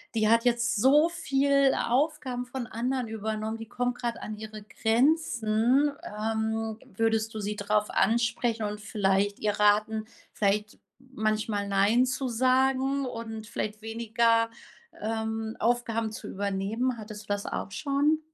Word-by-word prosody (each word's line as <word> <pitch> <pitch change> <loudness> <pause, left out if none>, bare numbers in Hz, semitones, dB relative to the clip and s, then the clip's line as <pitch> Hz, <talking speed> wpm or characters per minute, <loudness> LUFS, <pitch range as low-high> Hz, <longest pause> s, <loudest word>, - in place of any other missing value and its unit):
die 215 -1 +3
hat 230 +1 +4
jetzt 240 0 +2
so 290 +9 +5
viel 275 -4 +2
Aufgaben 260 -1 0
von 250 0 -5
anderen 245 +2 -2
übernommen, 220 0 -3
die 225 0 -8
kommt 245 +1 -2
grad 235 -2 -2
an 215 0 -5
ihre 215 0 -8
Grenzen. 240 +2 +2
Ähm, 220 +1 -2 0.2
würdest 225 0 +1
du - - -3
sie 205 +1 -2
drauf 210 +1 0
ansprechen 235 0 +1
und 210 0 -3
vielleicht 200 -1 +1
ihr 210 - +1
raten, 215 +1 +3 0.3
vielleicht 210 +1 0 0.2
manchmal 215 -5 -2
„nein“ 200 +5 +3
zu 255 +1 -2
sagen 265 +3 +2
und 225 -3 -6
vielleicht 215 -1 -4
weniger, 230 0 +2 0.5
ähm, 220 0 -3
Aufgaben 230 -1 0
zu 220 - -8
übernehmen? 205 +6 -1
Hattest 215 -1 -8
du - - -30
das 205 0 -4
auch - - -4
schon? 290 +5 +1
225 Hz, 135 wpm, -28 LUFS, 215-250 Hz, 0.5 s, so